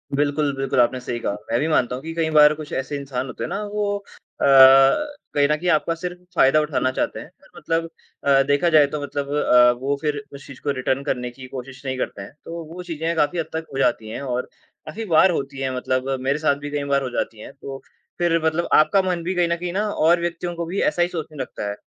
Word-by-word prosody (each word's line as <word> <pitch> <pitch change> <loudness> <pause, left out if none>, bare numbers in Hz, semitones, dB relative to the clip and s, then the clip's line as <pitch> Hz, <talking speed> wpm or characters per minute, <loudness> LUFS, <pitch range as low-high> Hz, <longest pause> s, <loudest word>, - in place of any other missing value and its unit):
बिल्कुल, 145 +1 +1
बिल्कुल, 135 -1 -1
आपने 125 +1 +3
सही 120 -1 -4
कहा। 100 - -2 0.2
मैं 115 - +2
भी 155 - 0
मानता 125 -6 +1
हूँ 130 - -8
कि 165 +1 -5
कई 165 -1 0
बार 150 0 +8
कुछ 155 -1 -9
ऐसे 135 +2 -3
इंसान 135 -2 -4
होते - - -6
हैं - - -3
ना, 200 +4 -3
वो 205 0 -2 0.4
अ, - - +3 0.9
कहीं 145 -1 +3
न 150 - +3
कहीं 175 +3 -2
आपका 165 +1 +2
सिर्फ 180 +2 -6 0.2
फायदा 145 0 +5
उठाना 130 -4 0
चाहते - - -2
हैं, - - -8 0.2
और - - -21
मतलब 165 -1 -2 0.3
अ, 140 -1 +5
देखा 145 +4 +2
जाए 155 -3 +6
तो 150 - -3
मतलब 145 0 -4
अ, 125 -4 +5
वो 140 +2 0
फिर 150 -2 -1
उस 140 - -11
चीज़ 135 - -12
को 145 - -1
रिटर्न 130 +1 -1
करने 125 -3 -2
की 130 +1 -11
कोशिश 130 +1 -9
नहीं 130 -1 -2
करते 115 - -4
हैं। 100 - -9
तो 170 0 -6
वो 180 +1 -7
चीज़ें 165 -1 -3
काफ़ी 160 +3 +1
हद 165 - -1
तक 160 0 -3
हो - - -4
जाती 120 -4 +1
हैं 110 - -6
और 125 -2 -3 0.4
काफ़ी 225 +2 -6
बार 180 0 +5
होती 140 -4 -4
हैं 135 -1 -1
मतलब 130 +1 -1
मेरे 135 +2 0
साथ 150 -2 +2
भी 145 - -5
कई 145 -1 -2
बार 140 - +3
हो 130 - -3
जाती 115 -2 -3
हैं। 135 - -10
तो 135 -1 -9 0.4
फिर 170 -1 +2
मतलब 160 +2 0
आपका 195 +6 +5
मन 180 -2 -2
भी 185 +2 -2
कहीं 175 -1 +2
न 170 - +1
कहीं 175 0 -4
ना 210 +3 0
और 170 0 +3
व्यक्तियों 175 0 -3
को 170 0 -3
भी 180 +4 -2
ऐसा 175 - -2
ही 175 - +3
सोचने 160 -3 -6
लगता 115 -5 -5
है। 100 - -4
150 Hz, 250 wpm, -22 LUFS, 135-170 Hz, 0.9 s, बार